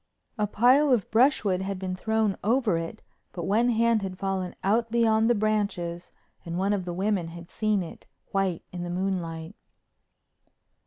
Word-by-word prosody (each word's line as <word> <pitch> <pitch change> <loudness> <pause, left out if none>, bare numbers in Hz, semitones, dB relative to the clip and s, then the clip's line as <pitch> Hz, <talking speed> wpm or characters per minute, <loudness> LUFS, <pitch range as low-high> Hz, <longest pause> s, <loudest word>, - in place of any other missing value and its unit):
A 210 - +2
pile 255 +8 +4
of 235 -7 +1
brushwood 220 -6 +3
had 195 0 -3
been 185 -1 -3
thrown 220 0 0
over 230 -3 +2
it, 165 0 -7 0.3
but 175 - -5
one 220 +7 +2
hand 230 -1 +3
had 190 -2 -5
fallen 190 -2 -2
out 225 +4 +2
beyond 225 -1 +3
the 240 - +4
branches 200 -5 -1 0.3
and 170 0 -4
one 195 +2 +1
of 190 -3 -2
the 175 - -4
women 190 -2 0
had 170 +1 -10
seen 215 -3 0
it, 165 - -11 0.2
white 195 -4 0
in 180 - -6
the 175 - -4
moonlight. 175 -2 -3
195 Hz, 165 wpm, -27 LUFS, 180-220 Hz, 0.3 s, pile